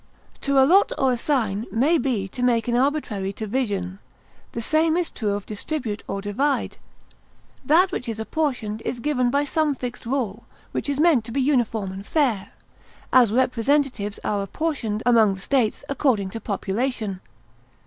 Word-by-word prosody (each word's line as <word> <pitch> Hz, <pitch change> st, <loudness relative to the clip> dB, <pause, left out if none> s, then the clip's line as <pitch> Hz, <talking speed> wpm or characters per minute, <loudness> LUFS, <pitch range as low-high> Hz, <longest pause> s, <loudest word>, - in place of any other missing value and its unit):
To 275 Hz, 0 st, +1 dB
allot 330 Hz, +10 st, +5 dB
or 265 Hz, -1 st, +3 dB
assign 235 Hz, -5 st, 0 dB
may 280 Hz, -, +3 dB
be 235 Hz, -9 st, -1 dB
to 245 Hz, -, -7 dB
make 240 Hz, -2 st, +2 dB
an 240 Hz, -, +1 dB
arbitrary 245 Hz, -8 st, 0 dB
division; 200 Hz, -4 st, -3 dB, 0.5 s
the -, -, -3 dB
same 315 Hz, +7 st, +2 dB
is 355 Hz, -2 st, -1 dB
true 215 Hz, -3 st, -2 dB
of 205 Hz, -1 st, -4 dB
distribute 220 Hz, 0 st, -4 dB
or 195 Hz, 0 st, -4 dB
divide. 265 Hz, +8 st, -1 dB, 0.8 s
That 340 Hz, +8 st, +4 dB
which 245 Hz, -, -4 dB
is 220 Hz, -1 st, -4 dB
apportioned 225 Hz, -4 st, -2 dB
is 245 Hz, -, -4 dB
given 255 Hz, -2 st, +1 dB
by 280 Hz, +3 st, +2 dB
some 300 Hz, 0 st, +1 dB
fixed 245 Hz, -2 st, -6 dB
rule, 235 Hz, -4 st, -2 dB, 0.3 s
which -, -, -3 dB
is 285 Hz, 0 st, -1 dB
meant 310 Hz, -7 st, +4 dB
to 230 Hz, -, -7 dB
be 275 Hz, -, -1 dB
uniform 235 Hz, -7 st, +1 dB
and 190 Hz, +1 st, -7 dB
fair; 225 Hz, -7 st, 0 dB, 0.6 s
as, 245 Hz, -5 st, +6 dB
representatives 250 Hz, -3 st, +1 dB
are 205 Hz, -1 st, 0 dB
apportioned 225 Hz, -, -2 dB
among 225 Hz, -5 st, +5 dB
the -, -, -10 dB
States 240 Hz, +2 st, 0 dB
according 250 Hz, -9 st, +1 dB
to 225 Hz, -, -6 dB
population. 210 Hz, -1 st, -2 dB
245 Hz, 160 wpm, -23 LUFS, 210-280 Hz, 0.8 s, as